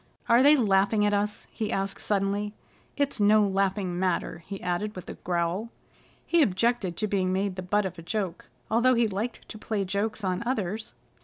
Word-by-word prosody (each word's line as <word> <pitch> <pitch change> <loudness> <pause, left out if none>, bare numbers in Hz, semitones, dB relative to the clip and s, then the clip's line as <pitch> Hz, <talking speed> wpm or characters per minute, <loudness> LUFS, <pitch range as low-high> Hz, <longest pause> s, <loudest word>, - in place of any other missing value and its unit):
"Are 235 +2 +6
they 290 +3 +7
laughing 210 -2 +3
at 205 - +2
us?" 205 +1 -1
he 215 -2 -3
asked 195 0 -2
suddenly. 205 +1 -1 0.4
"It's 285 -4 0
no 210 +1 +5
laughing 195 -2 0
matter," 180 -2 -1
he 195 -1 -5
added 180 +4 -2
with 185 - -8
a - - -6
growl. 175 +5 -2 0.6
He 340 -1 +3
objected 215 - +1
to 215 - 0
being 190 -2 0
made 190 0 0
the 185 - -4
butt 205 +3 +1
of 185 -2 -5
a - - -7
joke, 185 +1 -3 0.3
although 245 +3 +4
he 235 -1 +3
liked 215 +4 -4
to 215 - -8
play 210 -2 -2
jokes 205 +3 -2
on 185 -1 -1
others. 220 -3 -3
205 Hz, 185 wpm, -27 LUFS, 185-220 Hz, 0.6 s, they